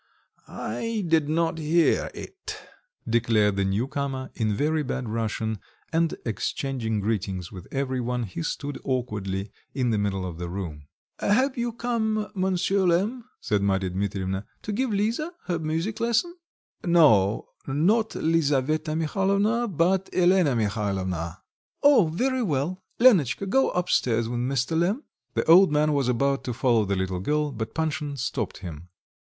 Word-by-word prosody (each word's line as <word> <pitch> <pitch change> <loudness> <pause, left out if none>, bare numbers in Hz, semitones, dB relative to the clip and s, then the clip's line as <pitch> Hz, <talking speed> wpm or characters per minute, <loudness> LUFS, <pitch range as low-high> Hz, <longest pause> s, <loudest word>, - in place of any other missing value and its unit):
"I 230 -4 -3
did 160 -3 +2
not 165 +1 +1
hear 160 +2 +2
it," 390 - -8 0.5
declared 110 -3 +2
the 100 - +1
new 100 +6 0
comer, 135 -2 -3
in 110 -3 0
very 155 +5 +1
bad 130 -3 -3
Russian, 110 -1 -2 0.3
and 165 0 +2
exchanging 115 -1 -2
greetings 95 -4 -2
with 90 -3 -10
every 130 -2 -1
one, 125 0 -1
he 90 -5 -5
stood 145 - -4
awkwardly 105 -6 -2 0.2
in 125 -4 +1
the 110 - +1
middle 95 -2 -1
of 85 -2 -6
the 85 -1 -4
room. 80 -6 -6 0.3
"Have 255 +6 +2
you 240 0 -1
come, 220 -2 -1
Monsieur 190 0 +1
Lemm," 210 +8 +1 0.2
said 105 -1 0
Marya 95 -2 +1
Dmitrievna, 95 0 -2 0.2
"to 215 - -3
give 255 +5 0
Lisa 225 - -1
her 175 -3 -1
music 165 +8 -2
lesson?" 235 +10 +1 0.5
"No, 135 - +4 0.2
not 195 +11 +2
Lisaveta 155 -1 +1
Mihalovna, 200 +8 +1
but 185 +1 +1
Elena 180 -6 +3
Mihalovna." 95 -6 -2 0.4
"Oh! 280 - +6
very 260 +9 0
well. 170 - -1 0.2
Lenotchka, 195 - +5
go 265 +8 +3
up 180 0 -1
stairs 115 -2 +2
with 120 +1 -2
Mr. 130 +4 0
Lemm." 200 - +1 0.3
The - - +2
old 175 +1 +7
man 150 0 +3
was 140 -3 +1
about 135 +3 +1
to 125 - -3
follow 115 -4 +3
the 100 0 0
little 95 -1 -2
girl, 150 +8 0
but 110 -3 -5
Panshin 150 -3 -2
stopped 120 -5 -3
him. 85 +1 -8
140 Hz, 150 wpm, -26 LUFS, -, 0.5 s, old